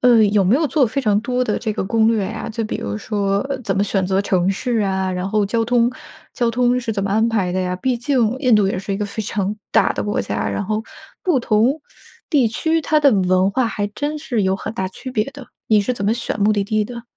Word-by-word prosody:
呃， 240 -3 +6
有 205 -1 +2
没 195 +7 +4
有 315 - +2
做 280 -6 +3
非 275 +5 -2
常 210 -3 +2
多 250 +1 0
的 215 -4 0
这 220 - -2
个 210 - -3
攻 220 +3 +2
略 220 -3 +2
呀？ 220 +3 -5
就 225 0 -3
比 215 - -3
如 100 0 -4
说， 200 - -1
呃， 270 -2 -2
怎 - - -1
么 195 - +2
选 195 -2 0
择 190 +1 +1
城 185 -2 +1
市 235 +5 -1
啊， 190 -1 0
然 180 +1 -3
后 210 0 +1
交 225 +3 0
通 240 0 +2 0.4
交 240 -2 0
通 245 +1 +2
是 235 -3 -3
怎 200 - -2
么 200 - -2
安 220 +3 +2
排 205 -6 0
的 185 - -1
呀？ 180 0 -1
毕 250 +7 -1
竟 245 -2 +1
印 255 -5 +3
度 205 -2 +4
也 190 - -2
是 195 +1 -4
一 - - -2
个 210 - -2
非 205 +2 -5
常 205 0 -2 0.2
大 - - +4
的 - - -3
国 205 - -1
家， - - -2
然 200 - -2
后 215 +2 -1 0.4
不 335 -8 +2
同 240 +7 +2 0.5
地 280 -6 +4
区 320 +9 0
它 305 0 +2
的 285 -2 +6
文 185 -2 +2
化 255 +3 +1
还 205 -2 -2
真 290 +9 -3
是 240 -9 -1
有 190 0 +2
很 210 +2 -5
大 190 -5 -2
区 255 +7 -8
别 215 -4 0
的， 280 -3 -11 0.2
你 215 -2 +4
是 225 +5 -1
怎 200 -5 -4
么 215 - +2
选 235 -2 -3
目 210 +1 +4
的 205 -1 +1
地 215 +1 0
的？ 235 +1 -8
215 Hz, 285 characters per minute, -20 LUFS, 195-245 Hz, 0.5 s, 呃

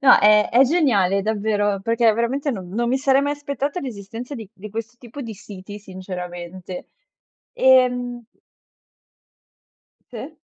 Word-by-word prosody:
No, 265 -2 +7
è 210 0 +5
è 245 +3 +6
geniale 220 - +2
davvero, 205 -1 0
perché 230 +2 +3
veramente 255 +6 0
non 190 -8 -5
non 235 +5 -1
mi 260 +2 +2
sarei 270 0 +3
mai 285 +1 0
aspettata 290 +3 -3
l'esistenza 235 - -7
di 220 -5 -8
di 215 0 -10
questo 225 +3 -6
tipo 245 +3 -10
di 230 -3 -6
siti 205 0 -10
sinceramente. 180 -2 -7 0.7
Ehm 250 - +3 1.9
Se. 260 +6 -8
230 Hz, 130 wpm, -22 LUFS, 200-260 Hz, 1.9 s, No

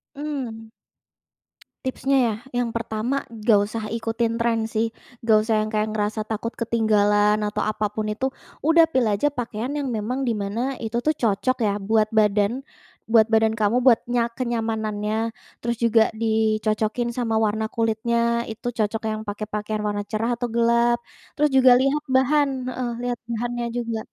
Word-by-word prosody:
Mmm. 255 -7 -5 1.2
Tipsnya, 270 +1 0
ya? 215 - -1 0.2
Yang 240 -1 0
pertama, 230 +4 -2
nggak 215 -2 +3
usah 220 +1 -4
ikutin 230 0 -1
tren 230 -1 0
sih, 225 0 -1 0.3
nggak 220 -2 +5
usah 220 +1 0
yang 215 - -4
kayak, 215 0 0
ngerasa 215 +1 -2
takut 225 +1 -3
ketinggalan 210 -2 +3
atau 210 0 -1
apapun 215 0 -2
itu, 260 +5 -1 0.4
udah, 330 0 +7
pilih 230 -6 +2
aja 290 +8 +1
pakaian 245 0 -4
yang 275 - -2
memang 245 +3 -2
di 230 - +1
mana 225 +7 -2
itu 230 +2 -1
tuh, 305 +4 0
cocok 230 +2 0
ya, 205 0 +1
buat 215 +2 +1
badan, 215 +5 +2 0.4
buat 225 0 +4
badan 220 0 +3
kamu, 220 +3 +2
buat 250 -2 +4
nya 235 -1 +2
kenyamanannya. 225 -2 -2 0.3
Terus 235 0 0
juga, 230 -1 +4
dicocokin 220 +1 0
sama 225 -3 0
warna 220 +1 -1
kulitnya, 235 +1 0
itu 220 - -7
cocok 215 0 -1
yang 215 0 -2
pakai 210 0 -5
pakaian 210 0 -3
warna 205 0 -2
cerah 225 +3 0
atau 245 +1 -3
gelap. 235 0 +3 0.4
Terus 300 - +5
juga 260 -1 +7
lihat 275 +3 +1
bahan 285 +2 +3 0.2
heeh, 255 -1 -3 0.2
lihat 245 -1 -2
bahannya 240 +1 -2
juga. 230 -2 -2
225 Hz, 155 wpm, -23 LUFS, 215-240 Hz, 1.2 s, udah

